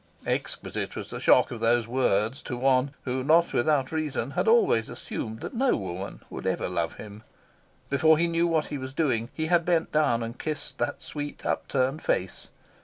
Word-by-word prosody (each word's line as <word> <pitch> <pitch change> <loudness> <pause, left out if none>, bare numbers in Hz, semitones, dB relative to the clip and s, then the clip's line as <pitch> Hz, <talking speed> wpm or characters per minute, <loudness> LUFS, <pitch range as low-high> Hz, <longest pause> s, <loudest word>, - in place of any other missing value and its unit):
Exquisite - - -3
was - - -6
the - - -5
shock - - +4
of 120 - -5
these 115 0 +3
words 120 0 +1
to 125 - -5
one 135 +2 +2
who, 130 0 -2
not 165 +4 +4
without 135 +1 +2
reason, 150 -5 -2
had 140 - -1
always 220 - +4
assumed 110 +1 -6
that - - -6
no 255 +2 +2
woman 95 0 -5
would - - -6
ever - - 0
love - - -2
him. 105 0 -10 0.7
Before 155 +3 +4
he 170 - +3
knew 170 0 +2
what 160 -2 +1
he 145 - -5
was 130 +1 -7
doing, 125 -8 +1
he 160 - -3
had 170 +1 +3
bent 165 -1 +1
down 145 -7 +2
and 115 +2 -6
kissed 155 -2 -5
the 120 - 0
sweet 145 -1 -7
upturned 135 +3 0
face. 95 0 -2
135 Hz, 185 wpm, -27 LUFS, 120-160 Hz, 0.7 s, shock